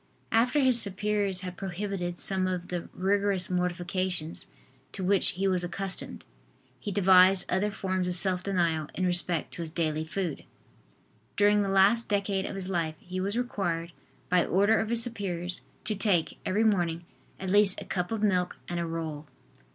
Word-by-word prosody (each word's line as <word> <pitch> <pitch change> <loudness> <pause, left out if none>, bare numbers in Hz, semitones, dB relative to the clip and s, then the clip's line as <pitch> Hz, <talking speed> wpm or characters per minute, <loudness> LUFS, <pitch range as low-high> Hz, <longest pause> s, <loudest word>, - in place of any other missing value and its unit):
After 245 +6 +2
his 255 -3 +7
superiors 200 -1 +1
had 180 -1 -6
prohibited 190 -2 -4
some 190 0 0
of 180 -1 -4
the 175 -2 -5
rigorous 195 0 0
mortifications 180 -1 0 0.5
to 190 - -4
which 195 +1 +4
he 195 +1 -1
was 185 -2 +1
accustomed, 190 +2 -2 0.5
he 205 - -5
devised 190 -1 +5
other 190 +3 +1
forms 185 -2 -2
of 180 - 0
self 185 0 +1
denial 170 -5 0
in 185 - -1
respect 175 -2 0
to - - -7
his 165 - -4
daily 155 -1 -1
food. 165 -1 -4 0.9
During 205 0 +4
the 200 - -1
last 195 +4 +3
decade 200 -2 -1
of - - -6
his 190 -1 -4
life 165 -4 -2
he 185 +1 -7
was 200 +4 -2
required, 175 -9 -2 0.4
by 180 -1 +3
order 205 +4 +2
of 220 - -2
his 235 0 +2
superiors, 180 -6 -3 0.2
to 215 - -1
take, 195 -5 +1
every 205 +4 +1
morning, 175 -6 0 0.3
at 190 -1 -4
least 205 -1 +4
a - - -9
cup 180 0 -3
of 220 -1 -2
milk 180 -3 +1
and 175 0 -3
a 170 - -2
roll. 160 -2 -5
185 Hz, 170 wpm, -28 LUFS, 175-200 Hz, 0.9 s, his